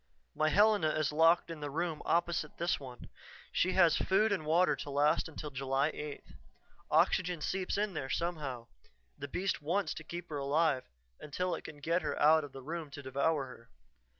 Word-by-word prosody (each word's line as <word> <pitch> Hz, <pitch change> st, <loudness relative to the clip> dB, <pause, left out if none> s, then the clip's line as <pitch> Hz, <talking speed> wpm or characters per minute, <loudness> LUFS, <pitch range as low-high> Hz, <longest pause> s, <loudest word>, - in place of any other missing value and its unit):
"My 155 Hz, -, +1 dB
Helena 205 Hz, -4 st, +4 dB
is 155 Hz, -1 st, 0 dB
locked 165 Hz, +2 st, +4 dB
in 165 Hz, -, -7 dB
the 145 Hz, -1 st, -4 dB
room 160 Hz, +1 st, -2 dB
opposite 170 Hz, -3 st, 0 dB
this 170 Hz, +2 st, 0 dB
one. 125 Hz, -3 st, -10 dB, 0.4 s
She 185 Hz, -, +1 dB
has 175 Hz, -4 st, +5 dB
food 210 Hz, +3 st, +2 dB
and 160 Hz, -6 st, -1 dB
water 175 Hz, +4 st, +4 dB
to -, -, -6 dB
last 145 Hz, +3 st, +2 dB
until 150 Hz, -1 st, -7 dB
July 135 Hz, +2 st, 0 dB
8th. 150 Hz, -1 st, -8 dB, 0.6 s
Oxygen 180 Hz, -2 st, +2 dB
seeps 185 Hz, +5 st, -2 dB
in 205 Hz, -1 st, 0 dB
there 135 Hz, -4 st, -4 dB
somehow 145 Hz, -9 st, -3 dB, 0.5 s
the 145 Hz, -1 st, -7 dB
beast 185 Hz, +4 st, -2 dB
wants 180 Hz, +7 st, 0 dB
to 155 Hz, -, -8 dB
keep 175 Hz, +2 st, -7 dB
her 150 Hz, -2 st, -3 dB
alive 140 Hz, -1 st, +1 dB, 0.3 s
until 180 Hz, +5 st, -3 dB
it -, -, -5 dB
can 150 Hz, -, -9 dB
get 170 Hz, +4 st, +1 dB
her -, -, -3 dB
out 155 Hz, +1 st, +5 dB
of 145 Hz, -, -8 dB
the 135 Hz, -1 st, -10 dB
room 160 Hz, +1 st, -5 dB
to 145 Hz, 0 st, -9 dB
devour 140 Hz, +2 st, 0 dB
her." 115 Hz, -2 st, -13 dB
155 Hz, 185 wpm, -32 LUFS, 145-175 Hz, 0.6 s, has